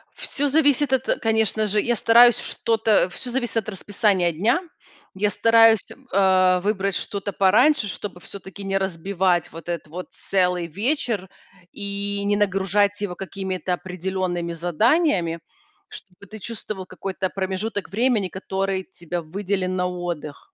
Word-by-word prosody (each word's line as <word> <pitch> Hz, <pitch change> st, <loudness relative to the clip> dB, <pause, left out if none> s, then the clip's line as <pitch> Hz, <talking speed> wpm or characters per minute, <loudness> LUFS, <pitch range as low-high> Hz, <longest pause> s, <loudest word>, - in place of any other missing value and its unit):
Всё 285 Hz, +1 st, -2 dB
зависит 285 Hz, -2 st, +3 dB
от, 260 Hz, -, +1 dB, 0.2 s
конечно 220 Hz, -1 st, +1 dB
же 210 Hz, +1 st, +2 dB
я 240 Hz, 0 st, 0 dB
стараюсь 235 Hz, +2 st, +6 dB
что-то 220 Hz, -4 st, +1 dB
всё 245 Hz, +7 st, -5 dB
зависит 240 Hz, -2 st, -1 dB
от 215 Hz, -1 st, -1 dB
расписания 195 Hz, -3 st, +1 dB
дня. 220 Hz, -, +2 dB, 0.6 s
Я 205 Hz, +2 st, +1 dB
стараюсь, 225 Hz, +1 st, +5 dB, 0.3 s
а, 185 Hz, -1 st, +4 dB
выбрать 200 Hz, -1 st, 0 dB
что-то 200 Hz, 0 st, -3 dB
пораньше, 220 Hz, +5 st, +4 dB
чтобы 185 Hz, 0 st, -6 dB
всё-таки 195 Hz, +2 st, -9 dB
не 195 Hz, 0 st, 0 dB
разбивать 185 Hz, -1 st, 0 dB
вот 165 Hz, 0 st, -11 dB
этот 170 Hz, -3 st, -4 dB
вот 180 Hz, +4 st, -7 dB
целый 180 Hz, -3 st, 0 dB
вечер 210 Hz, -, -1 dB, 0.4 s
и 200 Hz, 0 st, -3 dB
не 205 Hz, 0 st, +2 dB
нагружать 205 Hz, 0 st, +1 dB
его 180 Hz, -3 st, -3 dB
какими-то 190 Hz, -1 st, -4 dB
определенными 180 Hz, -1 st, -3 dB
заданиями. 175 Hz, -, +1 dB, 0.5 s
Чтобы 195 Hz, +1 st, -13 dB
ты 215 Hz, +4 st, -9 dB
чувствовал 210 Hz, -3 st, -6 dB
какой-то 185 Hz, 0 st, -4 dB
промежуток 195 Hz, +2 st, -3 dB
времени, 220 Hz, 0 st, +1 dB
который 190 Hz, +1 st, -3 dB
тебя 175 Hz, -2 st, -6 dB
выделен 185 Hz, +2 st, -2 dB
на 180 Hz, 0 st, 0 dB
отдых, 175 Hz, -, -6 dB
195 Hz, 135 wpm, -23 LUFS, 180-215 Hz, 0.6 s, стараюсь